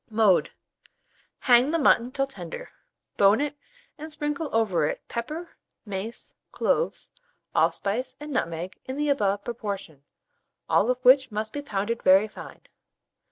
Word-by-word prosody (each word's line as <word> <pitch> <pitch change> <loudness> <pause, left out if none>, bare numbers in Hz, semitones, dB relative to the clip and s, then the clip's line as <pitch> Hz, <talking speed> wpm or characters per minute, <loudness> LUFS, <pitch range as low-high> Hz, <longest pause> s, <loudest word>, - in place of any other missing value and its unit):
Mode. 215 -5 +3 0.9
Hang 245 +1 +4
the 330 - +1
mutton 250 -5 +3
till 275 0 0
tender, 485 - -8 0.5
bone 200 +3 +5
it, 290 0 -2 0.4
and 310 +1 -7
sprinkle 295 0 -2
over 190 -9 +2
it - - -5
pepper, 305 +9 -5 0.3
mace, 205 +3 -6 0.2
cloves, 485 - -1 0.4
allspice, 250 +6 0
and 295 0 -7
nutmeg 170 - -3
in 260 +1 -5
the 295 0 0
above 205 -7 +1
proportion, 200 - -6 0.6
all 225 - +3
of 250 - +2
which 260 0 +6
must 215 +1 -3
be 290 - -3
pounded 225 -3 -2
very 190 +3 +5
fine. 215 - -11
235 Hz, 135 wpm, -26 LUFS, 200-285 Hz, 0.9 s, which